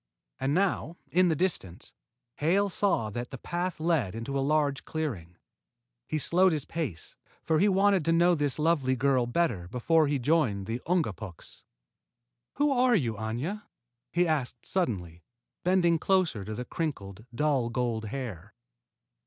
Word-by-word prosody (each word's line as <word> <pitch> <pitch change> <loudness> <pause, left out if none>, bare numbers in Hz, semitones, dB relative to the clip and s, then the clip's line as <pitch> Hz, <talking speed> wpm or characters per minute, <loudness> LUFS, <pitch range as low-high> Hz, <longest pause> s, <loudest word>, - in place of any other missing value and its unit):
And 135 +3 0
now, 180 -3 0
in 180 +1 +4
the 160 - +2
distance, 150 - -2 0.4
Hale 195 +7 +2
saw 160 - +1
that 120 +3 -5
the 135 - -7
path 175 +5 -3
led 155 - 0
into 115 +5 -4
a 135 - +1
large 145 -1 +1
clearing. 105 - -4 0.7
He 155 - -1
slowed 180 +4 +3
his 150 -3 -2
pace, 135 - -5 0.3
for 160 -1 +2
he 205 - +4
wanted 195 -2 +3
to 165 - +2
know 170 +2 +4
this 145 -4 0
lovely 150 -5 +2
girl 130 -1 +2
better 120 - 0
before 150 - +2
he 145 0 +1
joined 125 -8 +1
the 115 +4 -4
Ungapuks. 105 - -3 0.9
"Who 290 0 +2
are 250 -2 +4
you, 125 - +1
Aña?" 120 - -4 0.5
he 175 +1 +2
asked 135 -6 -2
suddenly, 90 - -2 0.4
bending 175 -2 +3
closer 180 - +1
to 110 +1 -5
the 125 - -5
crinkled, 110 - -4
dull 135 -3 +1
gold 115 -2 -1
hair. 110 -7 -6
145 Hz, 150 wpm, -28 LUFS, 115-170 Hz, 0.9 s, in